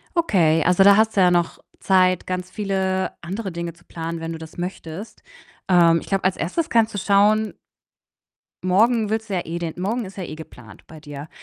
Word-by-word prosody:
Okay, 170 - +3
also, 180 +2 +4
da 200 0 +7
hast 220 -1 +2
du - - +4
ja 180 - +5
noch 175 -1 0 0.2
Zeit, 185 -2 +2
ganz 185 0 -4
viele 190 -2 -1
andere 195 +4 -5
Dinge 170 -1 -5
zu 175 +1 -24
planen, 165 0 -6
wenn 165 0 -5
du 160 - -6
das 160 +1 -12
möchtest. 180 +4 -7 0.5
Ähm, 170 -2 +5
ich - - -12
glaube, 195 -1 -1
als 185 0 +1
1. 295 - -2
kannst 225 -1 +2
du - - -3
schauen 210 +2 +2 1.1
morgen 215 +4 +2
willst 220 +1 -2
du 195 - -3
ja 180 - 0
eh 170 +1 -4
den 170 -2 -4
morgen 215 +7 -2
ist 195 +1 -11
ja 190 - -5
eh 160 -3 -7
geplant 125 -8 -13
bei 155 -1 -13
dir 145 0 -9
185 Hz, 205 wpm, -22 LUFS, 165-205 Hz, 1.1 s, da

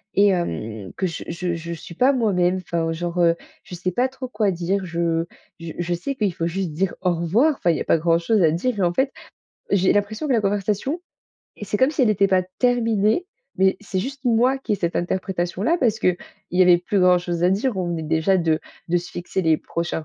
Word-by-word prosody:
et 205 +1 +5
hem, 110 - -3
que 190 - 0
je 165 - -6
je 170 +1 -2
je 170 +1 -5
suis 170 +1 -10
pas 260 +9 +4
moi-même. 185 -7 +2
Enfin, 170 -2 -2
genre, 170 +1 -4
heu, 170 -1 +4 0.3
je - - -12
sais 185 +1 -2
pas 245 +8 +1
trop 260 0 -7
quoi 210 -4 0
dire, 185 +2 -1
je 170 -1 -1 0.3
j 165 -1 -7
je 175 0 -1
sais 185 +11 -3
qu'il 210 -6 0
faut 165 - -3
juste 180 0 -2
dire: 185 +4 -1
«au 180 -1 +2
revoir», 205 - +2
enfin, 175 - 0
il 160 - 0
y - - -4
a - - 0
pas - - +3
grand 165 +1 +3
chose 205 +5 +1
à 160 - +5
dire 210 +9 -1
et - - -1
en 175 -1 +2
fait, 265 +7 +1 0.6
j'ai 190 -1 +3
l'impression 210 +7 -1
que - - +2
la 230 - +3
conversation, 205 - -1 0.6
c'est 210 0 -1
comme 260 +6 +3
si 300 -3 0
elle 230 - +4
était 200 -1 +3
pas 185 -1 +3 0.2
terminée. 230 - +2 0.3
Mais, 190 0 +3
c'est 205 -2 -4
juste 270 +4 -6
moi 245 +3 +3
qui 255 -5 -3
ai - - +4
cette 170 -3 -2
interprétation-là 185 - -1
parce 225 -4 +2
qu'il 180 -4 +1 0.3
y 180 - +1
avait 180 -1 +7
plus 185 +3 -1
grand 180 0 +6
chose 175 -1 -3
à 175 - +5
dire. 210 +6 +1
On 180 - -1
venait 170 -2 -3
déjà 160 +4 +2
de 165 -3 +1 0.3
de 175 - +2
se 175 +1 -9
fixer 175 +2 -3
les 160 -3 +3
prochains 170 0 -4
185 Hz, 235 wpm, -22 LUFS, 170-215 Hz, 0.6 s, avait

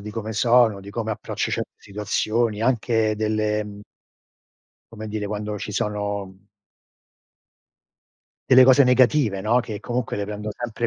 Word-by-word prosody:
di 105 +1 -7
come 110 0 -5
sono, 115 -3 +3
di 100 - -10
come 110 +1 -3
approccio - - -4
certe - - -3
situazioni, 105 +2 -1
anche 115 -3 +1
delle 110 0 0 1.3
come 110 -1 -7
dire, 105 -1 -4
quando 105 0 -4
ci 105 - -6
sono 100 -2 -4 2.0
delle 130 0 +8
cose 130 +2 +6
negative, 125 -4 +3
no, 110 +5 +2
che 110 -4 -5
comunque 120 -1 -3
le 100 - -2
prendo 105 +1 -5
sempre 120 -1 -3
110 Hz, 135 wpm, -23 LUFS, 105-120 Hz, 2.0 s, delle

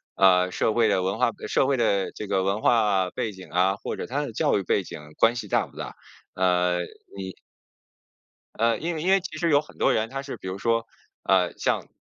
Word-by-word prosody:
呃， 90 -1 +5
社 110 - 0
会 115 -1 +3
的 95 -3 +1
文 95 +4 -2
化 125 -2 +3
背 - - -10
社 130 - +2
会 135 -1 +1
的 100 -5 +1
这 105 - -6
个 95 -1 +1
文 100 +2 0
化 105 -6 +3
背 110 - -3
景 95 -1 -12
啊， 95 +2 +2
或 - - -5
者 - - -6
他 140 +4 -2
的 120 - -7
教 - - +2
育 100 - -2
背 95 - +1
景 80 - -9 0.2
关 115 +1 +4
系 115 -4 -5
大 - - +1
不 - - -19
大？ - - -6 0.4
呃， 90 -1 +2 0.4
你 95 -2 -6 1.2
呃， 115 -1 +3
因 170 +2 -2
为 155 - -4
因 180 - 0
为 195 - +5
其 175 -4 -7
实 170 0 0
有 145 -2 +4
很 150 - -18
多 - - +3
人 110 +1 0
他 135 +1 -4
是 140 - -6
比 - - -9
如 95 +1 -4
说， 115 +2 0 0.4
呃， 95 -2 +2
像， - - -1
105 Hz, 250 characters per minute, -25 LUFS, 95-125 Hz, 1.2 s, 呃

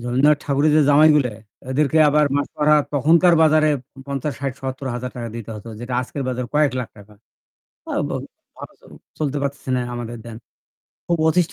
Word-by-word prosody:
রবীন্দ্রনাথ 130 +5 +2
ঠাকুরের 145 +1 +2
যে 155 - +5
জামাইগুলা 150 -3 +5 0.4
ওদেরকে 150 +3 +1
আবার 150 +1 +3
মাসোহারা 150 +1 +1 0.2
তখনকার 165 +5 +4
বাজারে 155 0 +4 0.4
৳৫০ 140 +1 -3
৳৬০ 135 -2 -2
৳৭০০০০ 125 -2 -5
দিতে 115 -1 -8
হতো, 105 +2 -10
যেটা 120 +1 -5
আজকের 130 +2 -5
বাজারে 125 -1 -3
কয়েক 150 -3 +3
লাখ 120 - -6
টাকা। 105 0 -15 0.8
আ - - -5 0.2
বা - - -4 0.5
অ - - -10 0.6
চলতে 145 -2 -1
পারতেছে 140 -1 -4
না - - 0
আমাদের 120 -1 -6
দেন। 115 -1 -9 0.7
খুব 170 -1 +1
অতিষ্ট 175 +1 +1
140 Hz, 155 wpm, -21 LUFS, 125-150 Hz, 0.8 s, যে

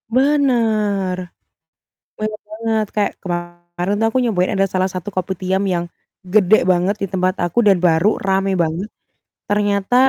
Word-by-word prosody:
Bener, 225 -9 +2 1.0
bener 215 0 -3
banget 220 0 -1
kayak 210 -1 +1
kemarin 175 +1 -4
tuh 225 - +2
aku - - +2
nyobain 190 -6 +1
ada 195 -1 +2
salah 185 0 +1
satu 185 +1 -5
kopitiam 185 +1 -1
yang, 170 0 -1 0.5
gede 210 0 +5
banget 185 +3 +2
di - - +1
tempat 185 0 +1
aku 175 +7 -2
dan 195 -2 +6
baru 165 +4 +3 0.2
rame 195 0 +1
banget, 165 +5 -2 0.6
ternyata 205 +1 +1
195 Hz, 135 wpm, -19 LUFS, 180-215 Hz, 1.0 s, dan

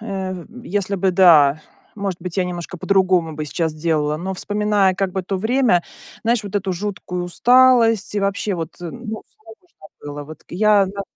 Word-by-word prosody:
э, 190 -4 -5 0.2
если 200 +1 -2
бы, 190 0 +1
да, 155 -5 +5 0.3
может 195 -4 -4
быть, 180 +1 -6
я 185 - +2
немножко 180 0 -6
по-другому 185 -4 +2
бы 155 - -4
сейчас 160 +2 -2
делала. 155 -2 0
Но 190 +4 -4
вспоминая 205 -1 +1
как 195 -1 -1
бы 190 - -2
то 195 +2 -3
время, 220 -3 +2 0.4
знаешь, 230 -1 +1
вот 200 0 -8
эту 195 -2 -1
жуткую 180 -1 -4
усталость 230 +1 +4
и 205 - 0
вообще 200 0 -1
вот, 165 -1 -6
э, - - -8
ну, 220 -2 -7
всё - - -39
равно, 225 +11 -16
что 155 - -17 0.2
было. 145 0 -6
Вот 155 +2 -12
к - - -18
я, 205 +1 +4
да 200 +1 -5
190 Hz, 195 wpm, -20 LUFS, 175-210 Hz, 0.4 s, да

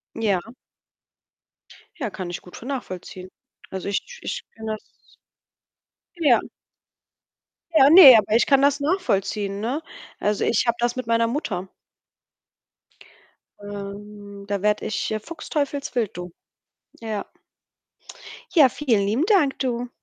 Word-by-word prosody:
Ja. 210 0 -1 1.5
Ja, 245 -7 -2
kann 180 -2 -6
ich 175 - -5
gut 180 - -13
vo - - -11
nachvollziehen. 185 -8 -6 0.4
Also, 190 +1 -5
ich 480 - -4
ich - - -4
kenne 220 -1 -5
das 215 - -5 1.4
Ja. 265 -7 +5 1.3
Ja, 275 -3 +7
ne, 295 -7 +11
aber 215 +1 +1
ich - - +4
kann 275 -1 +4
das 285 +1 +3
nachvollziehen, 205 - -1
ne? 255 +8 -2 0.4
Also, 210 0 0
ich 235 - +2
habe 235 0 +1
das 240 0 0
mit 255 -2 -5
meiner 230 0 +2
Mutter. 200 - -3 1.9
Ähm, 205 0 -9
da 200 -1 -3
werde 210 0 +1
ich, 200 -1 -2
äh, 215 0 -2
Fuchsteufelswild 285 - -3
du. 180 -1 -7 0.7
Ja. 220 -3 -4 1.3
Ja, 290 -6 +7
vielen 230 -7 0
lieben 235 +10 +1
Dank 360 -10 +2
du. 245 -2 -2
225 Hz, 125 wpm, -23 LUFS, 200-270 Hz, 1.9 s, ne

